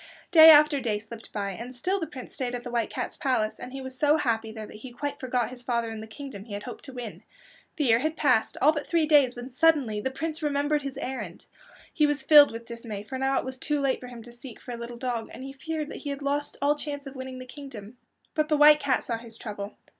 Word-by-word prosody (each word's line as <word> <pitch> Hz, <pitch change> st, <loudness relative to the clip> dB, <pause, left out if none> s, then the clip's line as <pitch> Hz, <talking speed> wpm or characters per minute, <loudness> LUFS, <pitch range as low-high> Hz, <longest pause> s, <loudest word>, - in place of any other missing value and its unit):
Day 320 Hz, -2 st, +10 dB
after 300 Hz, -2 st, +7 dB
day 225 Hz, -5 st, -1 dB
slipped 220 Hz, +2 st, -10 dB
by, 200 Hz, -2 st, -2 dB
and 235 Hz, +6 st, -8 dB
still 370 Hz, +11 st, -1 dB
the 325 Hz, -, -3 dB
Prince 260 Hz, -3 st, -10 dB
stayed 250 Hz, -2 st, -3 dB
at 245 Hz, -, -6 dB
the 245 Hz, -, -6 dB
White 235 Hz, -2 st, 0 dB
Cat's -, -, -4 dB
palace, 250 Hz, -6 st, 0 dB
and 250 Hz, -, -8 dB
he 270 Hz, 0 st, -6 dB
was 260 Hz, 0 st, -5 dB
so 295 Hz, +4 st, +3 dB
happy 225 Hz, -6 st, -1 dB
there 220 Hz, -1 st, -7 dB
that 210 Hz, -, -11 dB
he 245 Hz, +4 st, -10 dB
quite 285 Hz, +4 st, -4 dB
forgot 250 Hz, -2 st, -1 dB
his 250 Hz, -1 st, -8 dB
father 235 Hz, -2 st, -1 dB
and 220 Hz, -1 st, -6 dB
the 220 Hz, -, -8 dB
kingdom 220 Hz, -3 st, -9 dB
he 220 Hz, -, -9 dB
had 205 Hz, 0 st, -5 dB
hoped 245 Hz, -, -8 dB
to 270 Hz, -, -9 dB
win. 245 Hz, -4 st, -7 dB, 0.5 s
The 300 Hz, -, 0 dB
year 230 Hz, -3 st, +4 dB
had 310 Hz, +4 st, -1 dB
passed, 255 Hz, -7 st, +2 dB
all 300 Hz, -, +7 dB
but 295 Hz, -2 st, -4 dB
three 335 Hz, -2 st, +2 dB
days, 285 Hz, -5 st, +4 dB
when 245 Hz, +2 st, -8 dB
suddenly 255 Hz, -7 st, +3 dB
the 265 Hz, -, -1 dB
Prince 315 Hz, +4 st, -4 dB
remembered 295 Hz, 0 st, +1 dB
his 275 Hz, -1 st, -6 dB
errand. 235 Hz, -11 st, -5 dB, 0.5 s
He 300 Hz, -2 st, +3 dB
was 290 Hz, 0 st, 0 dB
filled 295 Hz, -2 st, +8 dB
with 230 Hz, +1 st, -7 dB
dismay, 230 Hz, -3 st, -6 dB
for 260 Hz, +5 st, -6 dB
now 270 Hz, 0 st, +1 dB
it -, -, -1 dB
was 260 Hz, 0 st, -5 dB
too 295 Hz, +1 st, -1 dB
late 275 Hz, -2 st, +1 dB
for 250 Hz, -, -9 dB
him 240 Hz, -2 st, -10 dB
to 240 Hz, -, -12 dB
seek 240 Hz, 0 st, -11 dB
for 250 Hz, -, -9 dB
a -, -, -4 dB
little 235 Hz, 0 st, -7 dB
dog, 235 Hz, -2 st, -3 dB
and -, -, -9 dB
he 270 Hz, 0 st, -7 dB
feared 305 Hz, +2 st, -4 dB
he 290 Hz, -, -6 dB
had 280 Hz, 0 st, -5 dB
lost 285 Hz, +1 st, -2 dB
all 290 Hz, +1 st, +4 dB
chance 290 Hz, -1 st, -5 dB
of 275 Hz, -, -8 dB
winning 260 Hz, 0 st, -6 dB
the 255 Hz, -, -8 dB
kingdom. 250 Hz, -4 st, -10 dB, 0.3 s
But 305 Hz, -1 st, 0 dB
the 305 Hz, -, +3 dB
White 300 Hz, 0 st, +8 dB
Cat 280 Hz, -3 st, +1 dB
saw 230 Hz, -2 st, -2 dB
his 230 Hz, -1 st, -10 dB
trouble. 205 Hz, -2 st, -7 dB
260 Hz, 265 wpm, -27 LUFS, 235-290 Hz, 0.5 s, Day